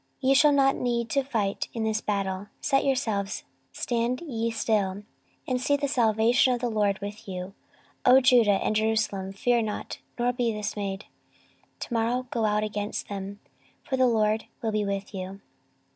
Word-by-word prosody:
14:020:017 260 - +3
Ye - - +7
shall 295 +2 +6
not 270 -1 +4
need 235 -2 -1
to 275 - +2
fight 215 -7 -1
in 225 - -1
this 220 -1 0
battle: 195 -1 -2
set 275 -2 +2
yourselves, 220 -7 -1 0.3
stand 240 +1 -1
ye 230 -8 -2
still, 205 -3 0 0.4
and 250 -1 0
see 285 +2 +2
the 285 0 -1
salvation 235 -1 +3
of - - -5
the 240 -1 -1
LORD 205 -2 +1
with 205 +2 -7
you, 185 0 -6 0.5
O 255 +1 +7
Judah 240 -6 +5
and 215 - 0
Jerusalem: 215 -3 0
fear 240 +4 +1
not, 215 -2 -4 0.2
nor 245 0 +1
be 245 -2 0
dismayed; 205 -1 -4 0.8
to - - -5
morrow 235 +2 0
go 230 -2 0
out 210 0 +1
against 210 0 -3
them: 200 +1 -6 0.4
for 265 - -2
the 260 -1 +4
LORD 220 -1 +1 0.2
will 225 - 0
be 215 0 0
with 200 +1 -3
you. 190 0 -6
220 Hz, 175 wpm, -27 LUFS, 205-245 Hz, 0.8 s, Ye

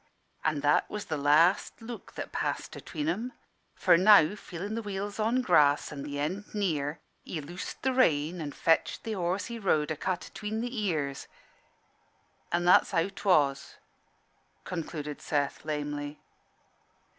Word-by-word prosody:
"An' 155 -2 0
that 145 +1 +3
was 210 0 -5
the 160 - -2
last 150 +6 +3
look 230 0 -9
that - - -6
passed - - -3
atween 150 -3 -5
'em. 220 +10 -2 0.4
For - - +5
now 190 -2 +7
feeling 200 0 -6
the 230 - -2
wheels 205 0 -5
on 235 +4 +2
grass 150 -8 +4
and 140 -2 -6
the 145 0 -5
end 185 +10 -3
near, 155 -7 -1 0.2
he 165 - -5
loosed 175 +5 -7
the 265 0 +2
rein 170 - +2
and 145 -2 -5
fetched 165 0 +1
the 225 - -3
horse 185 0 -1
he 235 -1 -6
rode 155 -7 +1
a - - -1
cut 185 +4 -2
atween 215 +1 -5
the 245 +2 -3
ears 145 -7 -2 1.2
an' 175 0 +1
that's 180 - +6
how 165 +4 +1
'twas," 145 -9 +1 0.9
concluded 150 -4 -5
Seth, 145 -2 -1
lamely. 145 -1 -4
170 Hz, 150 wpm, -29 LUFS, 150-205 Hz, 1.2 s, now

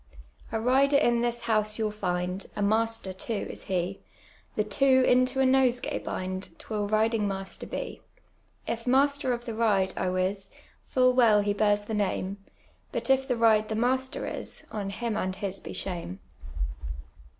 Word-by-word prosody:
*' - - -36
A 225 - 0
rider 270 +4 +4
in 240 -4 +3
this 240 0 -1
house 215 -2 0
you'll 215 -2 0
find, 180 -2 -2
A 205 - -1
master 220 -2 0
too 205 +3 -3
is - - -10
hv, 185 +1 -1 0.6
The - - +2
two 265 -2 +4
into 255 +1 +3
a - - +4
nosegay 260 -2 +2
bind, 185 +1 -5
'Twill 210 -2 -3
ridinf^ 215 0 +2
HKuster 195 -1 -5
\h. - - -5 0.6
If 230 +1 -4
master 275 +1 +3
of 240 0 -3
the 230 - -4
ride, 205 -4 +2
I - - 0
wis, 190 +2 -1 0.4
Full 255 -1 +3
well 225 -5 +5
he 205 0 0
bears 205 0 +2
the 220 - -5
name, 200 -1 -1 0.5
But - - 0
if 265 0 +3
the 250 -3 0
ride 220 -2 +4
the 220 - -1
master 260 +3 0
is. - - -6
On 205 -2 -3
him 220 +2 -3
and 185 -3 -1
his 195 -1 -4
be - - -8
shame." 170 - -5
220 Hz, 170 wpm, -28 LUFS, 195-245 Hz, 0.6 s, well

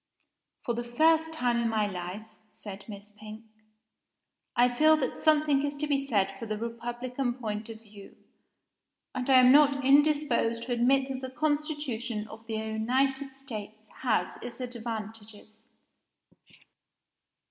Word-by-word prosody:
"For 240 - 0
the 240 +1 -3
first 320 +7 +3
time 250 -7 0
in 235 -1 +1
my 215 -1 +1
life," 185 +2 -5 0.2
said 205 0 -10
Miss 205 0 -10
Pink, 215 +1 -10 1.1
"I 245 +1 +5
feel 310 +6 +4
that 265 -4 -1
something 300 -3 +2
is 290 0 -2
to 295 +1 -2
be 275 -2 -1
said 195 -6 +1
for 230 - -6
the 215 0 -3
Republican 240 +2 -3
point 215 -2 -5
of 225 0 -10
view; 205 -2 -14 1.0
and 255 +1 -3
I 260 -1 +8
am 250 0 +7
not 280 -1 +5
indisposed 280 -5 +3
to 250 - -6
admit 260 +3 +3
that 260 -1 -4
the 260 - -5
constitution 285 -7 -2
of 220 +1 -12
the 225 - -3
United 260 +5 -1
States 220 -5 -7
has 235 -4 0
its 240 0 -8
advantages!" 220 -3 -8
240 Hz, 140 wpm, -28 LUFS, 220-275 Hz, 1.1 s, I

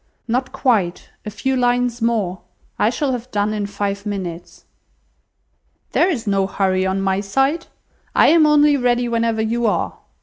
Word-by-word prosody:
"Not 255 +3 -1
quite, 205 -10 0 0.2
a - - -1
few 220 +6 -2
lines 245 -1 +1
more. 215 -6 0 0.4
I - - +3
shall 290 -3 -1
have 250 0 -4
done 205 -1 0
in 205 -1 -2
five 200 0 -3
minutes." 185 -5 -6 1.3
"There 370 - +3
is 250 -11 -2
no 195 -2 +1
hurry 190 -1 0
on 190 +1 -1
my 190 0 +1
side. 270 +11 0 0.5
I - - +6
am 315 -1 +5
only 295 -1 +5
ready 245 -1 +1
whenever 230 -1 0
you 230 +1 0
are. 205 - -1
225 Hz, 160 wpm, -20 LUFS, 200-250 Hz, 1.3 s, I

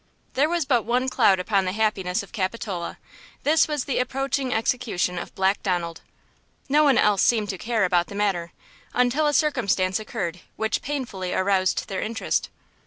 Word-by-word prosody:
There 290 +4 +2
was 340 -3 0
but 255 -4 +3
one 250 +3 +1
cloud 195 -6 +4
upon 195 +1 +1
the 185 - -1
happiness 200 -4 0
of 200 - -14
Capitola; 190 -3 -3 0.5
this 310 +2 +4
was 295 -4 -2
the 270 - -1
approaching 270 +1 -1
execution 220 -6 0
of - - -8
Black 190 +1 +1
Donald. 175 -4 -2 0.7
No 300 +2 +4
one 275 -5 +4
else 210 -2 +3
seemed 215 -4 +2
to 190 - -3
care 225 -4 +1
about 175 -1 +2
the 200 - -9
matter, 190 -5 0 0.4
until 250 +5 +2
a - - +3
circumstance 210 - +1
occurred 190 -6 -4 0.2
which 220 0 -1
painfully 235 -10 -3
aroused 185 -1 +1
their 190 -2 -3
interest. 225 +1 -1
215 Hz, 170 wpm, -24 LUFS, 185-255 Hz, 0.7 s, cloud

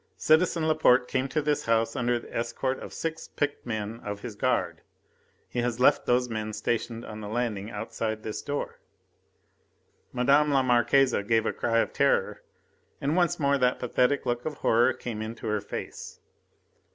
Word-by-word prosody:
Citizen 160 0 +3
Laporte 130 -5 +4
came 130 +1 -1
to 150 +3 -1
this 150 -1 0
house 115 0 +1
under 120 0 +1
the 120 - -10
escort 130 +3 -2
of - - -8
six 160 0 -4
picked 145 -3 -3
men 110 0 -4
of 105 -2 -6
his 120 -2 -6
guard. - - 0 0.7
He 125 - -4
has 120 -1 -1
left 125 - +4
these 125 0 +3
men 110 -2 -4
stationed 115 +1 -2
on 110 0 -8
the 105 - -6
landing 110 -2 -2
outside 110 0 -4
this 110 - -4
door." 145 0 -4 1.3
Madame 140 +4 +3
la 135 -2 +3
Marquise 130 +2 +3
gave 115 0 +2
a - - 0
cry 115 -1 0
of - - -3
terror, - - +1 0.6
and 145 +3 0
once 175 -2 +2
more 140 -1 +2
that 125 0 +2
pathetic 125 +3 +1
look 120 0 -1
of 155 -1 -4
horror 120 -1 +3
came 115 -3 -6
into 115 +1 -6
her 105 -1 0
face. 100 - -7
120 Hz, 170 wpm, -27 LUFS, 115-140 Hz, 1.3 s, Laporte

